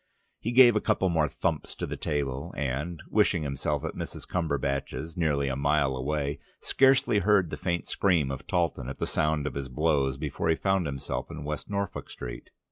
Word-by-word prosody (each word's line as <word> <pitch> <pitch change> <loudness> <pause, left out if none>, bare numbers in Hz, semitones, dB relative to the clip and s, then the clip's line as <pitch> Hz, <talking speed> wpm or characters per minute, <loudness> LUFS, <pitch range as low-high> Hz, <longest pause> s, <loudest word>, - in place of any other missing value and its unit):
He 115 - -2
gave 120 -2 +8
a 105 - +2
couple 95 - +2
more 80 -3 +2
thumps - - -2
to - - -3
the - - -4
table 70 -2 -2
and, 75 +4 -2
wishing 100 -6 +2
himself 70 +1 -2
at - - -3
Mrs. - - -6
Cumberbatch's 75 -1 -2
nearly 75 -5 +1
a 65 - -1
mile 70 -1 +2
away, 70 +2 -2 0.2
scarcely 135 -5 +4
heard 100 -3 +3
the - - -2
faint 85 -1 -2
scream 85 -9 +2
of 70 - -6
Talton 85 -8 0
at 65 - -6
the - - -1
sound 75 -1 +1
of - - -2
his 70 -1 -4
blows 70 -1 +1
before 75 +2 -2
he 80 - +4
found 95 -1 +1
himself 70 -2 -4
in - - -7
West 75 +1 -4
Norfolk 100 -1 -3
Street. - - -7
75 Hz, 190 wpm, -28 LUFS, 70-90 Hz, 0.2 s, gave